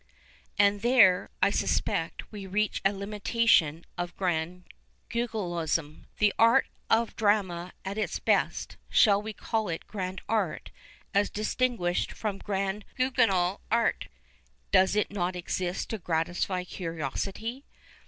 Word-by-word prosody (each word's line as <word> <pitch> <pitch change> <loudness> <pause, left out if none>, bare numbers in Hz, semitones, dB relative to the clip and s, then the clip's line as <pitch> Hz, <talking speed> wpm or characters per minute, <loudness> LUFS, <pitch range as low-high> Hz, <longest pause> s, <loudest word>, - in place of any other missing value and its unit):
And 205 0 +4
there, 225 -7 +5
I - - +5
suspect, - - -1
we 205 -3 -7
reach 210 +2 0
a 195 - +4
limitation 200 -5 +2
of 175 0 -4
Grand 180 -1 -2 0.5
Guignolism. 175 -10 -2
The 210 -1 +3
art 230 +1 +6 0.2
of 225 0 +2
drama 190 -5 +1
at 200 +3 -3
its - - -1
best - - 0
— - - -38
shall 205 -3 +5
we 220 +1 -5
call 220 0 -2
it 165 - -4
grand 190 -2 -5
art, 210 -6 -1 0.4
as 200 +1 +3
distinguished 215 -4 -1
from 205 -3 -3
Grand 195 +1 -2
Guignol 215 -8 +2
art? 230 0 +1 0.3
— - - -38
docs 190 +1 +4
not 180 -2 -1
exist 180 0 -3
to 220 - -3
gratify 175 +2 -1
curio 165 -6 -4
sity. 225 - -4
195 Hz, 130 wpm, -28 LUFS, 180-215 Hz, 0.5 s, art